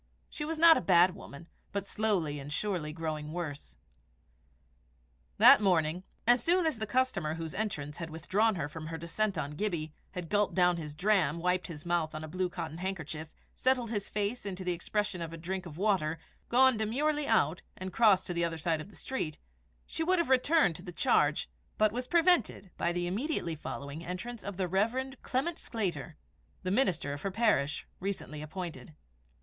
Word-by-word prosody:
She 295 - -4
was 320 +1 -3
not 330 0 +8
a - - 0
bad 180 0 +5
woman, 140 +1 -11 0.3
but 200 -1 -2
slowly 190 -9 0
and 140 +1 -8
surely 175 -3 -2
growing 155 -1 -4
worse. 150 - -5 1.6
That - - +9
morning, 175 -3 +2 0.2
as 240 +1 +5
soon 350 +1 +3
as 310 -8 0
the 220 - -2
customer 205 -10 0
whose 165 -1 -5
entrance 150 -9 -3
had 165 -1 -5
withdrawn 195 +7 +1
her 170 -4 -2
from 155 +1 -8
her 165 0 -4
descent 190 +5 -1
on 140 - -2
Gibbie, 155 -2 -2 0.2
had 180 -3 -5
gulped 205 +3 +1
down 180 -1 +4
his 150 -3 -6
dram, 180 -4 +2
wiped 180 +2 0
his 155 -3 -8
mouth 170 -3 0
with 155 - -5
his 155 - -7
blue 185 +1 -1
cotton 160 -1 -6
handkerchief, 160 -4 -4 0.2
settled 255 -3 +1
his 205 -3 -2
face 210 +4 -2
into 190 -2 -5
the 180 - 0
expression 185 +1 -2
of 165 -1 -5
a - - -6
drink 185 +2 -4
of 155 -2 -10
water, 180 -6 +1 0.3
gone 260 0 +5
demurely 285 +7 0
out, 180 -7 +2 0.2
and 185 0 -6
crossed 215 -5 +5
to 180 - -3
the 170 0 0
other 165 -1 -1
side 160 -1 0
of 170 - -10
the - - -16
street, 165 - -3 0.5
she 325 - -3
would 370 +3 +3
have 340 -5 +1
returned 260 - +4
to - - -10
the 180 -1 -8
charge, - - +2 0.3
but 215 -1 +4
was 250 +3 -4
prevented 330 - +2
by 170 - 0
the 175 0 -1
immediately 195 - -1
following 145 +1 -6
entrance 200 +7 -6
of 200 -2 -6
the 185 -2 0
Rev. 230 +9 0
Clement 300 +7 -1
Sclater 180 - -3 0.5
the 185 - -1
minister 185 - +1
of 145 - -6
her 195 - -1
parish, 190 - +1
recently 185 -6 -4
appointed. 170 0 -7
185 Hz, 190 wpm, -31 LUFS, 160-220 Hz, 1.6 s, That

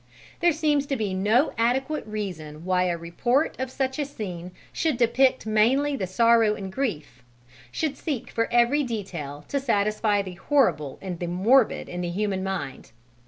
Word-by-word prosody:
There 345 0 +4
seems 295 -2 +1
to 275 - -1
be 210 -6 -2
no 215 +9 +2
adequate 265 +5 0
reason 170 -7 -6
why 185 0 +2
a 175 -1 0
report 240 - 0
of 260 0 -2
such 265 +2 -2
a 290 - 0
scene 180 -10 -6 0.2
should 315 -6 0
depict 255 +2 +3
mainly 250 +7 +2
the 190 -8 -3
sorrow 230 +2 +4
and 190 -2 -7
grief, 160 - -3 0.5
should 305 - -2
seek 285 -8 -4
for 230 - -1
every 240 +5 +4
detail 175 - -5
to 280 - 0
satisfy 210 -4 +1
the 185 -1 -7
horrible 175 - +1
and 180 -3 -5
the 175 - -3
morbid 215 +9 +3
in 180 0 -5
the 175 - -2
human 190 +1 -1
mind. 190 -12 -5
215 Hz, 165 wpm, -25 LUFS, 185-265 Hz, 0.5 s, There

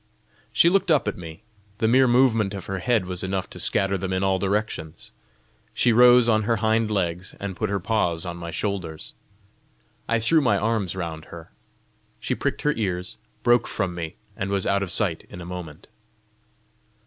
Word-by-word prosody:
She - - +4
looked 190 +1 +3
up 150 -8 +3
at 105 - -1
me; 85 +3 -10 0.3
the 110 - +1
mere 130 +3 +5
movement 115 -5 +3
of 95 - -7
her 95 -1 -4
head 115 -5 +1
was 90 0 -1
enough 95 0 -2
to - - -9
scatter 95 0 0
them 95 +1 -3
in 95 +1 0
all 95 -1 +2
directions. 100 -5 -3 0.6
She 120 - +3
rose 125 0 +7
on 110 -2 +3
her 115 +2 +1
hind 110 0 +1
legs, 90 -3 -2
and 100 -2 -5
put 105 +3 -2
her 100 0 -1
paws 90 -5 0
on 85 -1 -5
my 85 -1 -6
shoulders; 90 -4 -4 1.0
I 115 0 +2
threw 155 +8 +4
my 120 -7 +2
arms 105 -4 -1
round 80 -4 -5
her. 85 -1 -11 0.7
She - - -2
pricked - - -2
her 150 - +2
ears, 90 -4 -3 0.3
broke 120 0 +4
from 95 -4 -2
me, 85 -1 -6 0.2
and 95 0 -3
was 100 -1 -1
out 100 0 +1
of 100 - -3
sight 90 -6 0
in - - -10
a 85 - -8
moment. 85 -4 -8
100 Hz, 185 wpm, -24 LUFS, 90-115 Hz, 1.0 s, rose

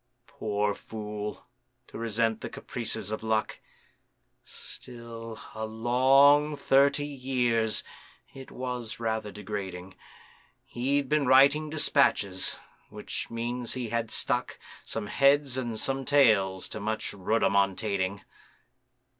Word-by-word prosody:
Poor 105 -1 -1
fool! 105 0 -6 0.4
to - - -15
resent 115 0 0
the - - -5
caprices 105 - -4
of 110 - -3
Luck. 110 -1 -1 0.8
Still, 115 -2 -7
a 110 0 -4
long 135 +6 +4
thirty 140 +1 +3
years 125 -5 0 0.5
(it 135 -1 -10
was 125 -3 -5
rather 110 -2 -2
degrading) 95 -3 -6 0.7
He'd 135 +3 -1
been 150 -1 +1
writing 140 +4 +5
despatches,—which 140 -11 0
means 120 +1 -2
he 125 -3 -4
had 115 -1 -1
stuck - - -1 0.3
Some - - -4
heads 140 +3 +3
and 120 -4 -3
some 135 +3 -1
tails 105 -10 +3
to - - -6
much 110 +1 -3
rhodomontading. 100 -1 0
115 Hz, 105 wpm, -28 LUFS, 105-135 Hz, 0.8 s, writing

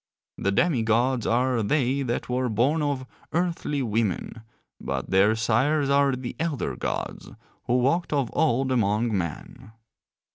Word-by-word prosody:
The 100 - 0
demi 140 - +2
gods 120 +2 +1
are 125 0 +2
they 135 +4 +1
that 120 -3 -2
were 125 0 -1
born 130 +9 +1
of 140 -3 -1 0.3
earthly 165 -5 -1
women, 110 -1 -2 0.4
but - - -4
their 100 +4 +4
sires 135 +6 +1
are 140 -1 +3
the 125 -1 -6
elder 150 - -2
gods - - -4 0.4
who 125 - +2
walked 140 +8 +1
of 140 -5 0
old 135 -3 +1
among 110 -1 +1
men. 90 +4 -5
125 Hz, 140 wpm, -25 LUFS, 110-140 Hz, 0.4 s, their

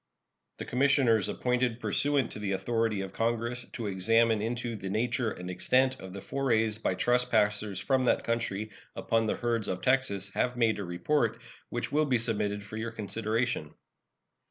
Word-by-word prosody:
The - - -6
commissioners 125 -5 +3
appointed 125 -1 0
pursuant 140 -1 +1
to - - -6
the 100 -2 -1
authority 115 0 0
of 95 -1 -6
Congress 115 +2 -1
to 115 - -4
examine 110 +3 +3
into 120 +1 -2
the 95 -2 -5
nature 115 +3 0
and 90 -3 -7
extent 130 +8 +2
of 95 - -9
the 100 +1 -7
forays 115 -5 0
by 95 - 0
trespassers 105 -4 +1
from 130 -2 +1
that - - +2
country 110 -2 -2 0.2
upon 115 -1 +1
the - - 0
herds 115 -3 -1
of 90 0 -3
Texas 100 -7 +1
have 125 0 0
made 110 -3 +2
a - - -3
report, 115 +7 0 0.3
which 120 - -3
will 155 +1 +3
be 130 -4 +2
submitted 105 -3 -1
for 105 +1 -8
your 115 +1 -3
consideration. 110 -4 -2
115 Hz, 165 wpm, -29 LUFS, 105-125 Hz, 0.3 s, commissioners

